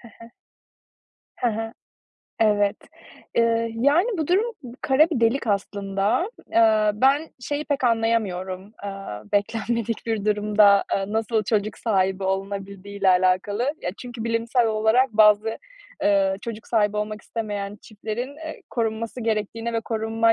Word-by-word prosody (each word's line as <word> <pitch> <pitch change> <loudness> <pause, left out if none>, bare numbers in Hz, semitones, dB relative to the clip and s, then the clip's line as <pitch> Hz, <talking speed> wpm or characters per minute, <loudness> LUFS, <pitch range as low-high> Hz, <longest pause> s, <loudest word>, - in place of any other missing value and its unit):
Hı 235 - -14
hı. 230 0 -13 1.1
Hı 245 - +1
hı. 225 +1 -4 0.7
Evet. 205 -2 +3 0.6
Eee, 230 0 +2
yani, 285 - +3
bu 315 - -1
durum 375 +7 +3 0.4
kara 300 +5 +4
bir 265 - -1
delik 230 +2 +2
aslında. 200 - 0 0.2
Eee, 220 -2 +4
ben, 275 +8 +3
şeyi 290 +4 -3
pek 285 -3 -1
anlayamıyorum, 210 -5 0
aaa, 195 - -6
beklenmedik 230 +2 -1
bir 220 -3 -1
durumda, 210 -1 +4
aaa, 195 +1 -1
nasıl 220 0 0
çocuk 215 0 -1
sahibi 195 -3 0
olunabildiği 195 +1 -4
ile 195 - +4
alakalı. 185 +4 +2 0.2
Ya, 175 - -1
çünkü 240 -2 -7
bilimsel 230 +1 +1
olarak 220 +4 +2
bazı, 215 +1 +4 0.4
eee, 195 -1 +3
çocuk 230 -2 -7
sahibi 210 -2 +1
olmak 210 0 -3
istemeyen 205 -3 -4
çiftlerin, 230 +5 -6
eee, 315 0 -8
korunması 230 +1 -2
gerektiğine 225 +1 -2
ve 230 - 0
korunma 225 0 +1
220 Hz, 135 wpm, -24 LUFS, 200-230 Hz, 1.1 s, kara